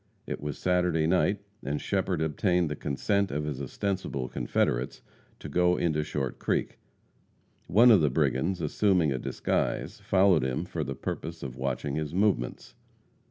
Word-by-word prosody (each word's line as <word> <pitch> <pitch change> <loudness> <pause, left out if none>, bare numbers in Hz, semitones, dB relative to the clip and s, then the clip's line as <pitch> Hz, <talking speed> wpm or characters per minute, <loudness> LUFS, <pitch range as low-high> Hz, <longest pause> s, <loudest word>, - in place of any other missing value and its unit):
It - - -5
was 75 -1 -4
Saturday 90 -3 +1
night, 95 +4 +2 0.2
and 70 +2 -2
Shepherd 95 -4 -1
obtained 85 +2 +1
the - - -2
consent 100 +9 0
of 75 +2 -2
his 75 -3 -4
ostensible 70 -3 -3
confederates - - -1 0.3
to - - -8
go 90 +4 +2
into 80 -3 +1
Short 70 -4 -3
Creek. - - -1 0.9
One 115 +7 +7
of 105 -6 +6
the 75 - +3
brigands, 85 +8 0
assuming 85 0 +2
a 65 - -1
disguise, - - -2
followed 95 -6 +3
him 65 +6 -1
for 85 -3 -3
the 70 -1 -4
purpose 80 +5 -5
of 65 -3 -6
watching 70 +2 -2
his 80 +1 -3
movements. 95 - 0
80 Hz, 155 wpm, -28 LUFS, 70-95 Hz, 0.9 s, One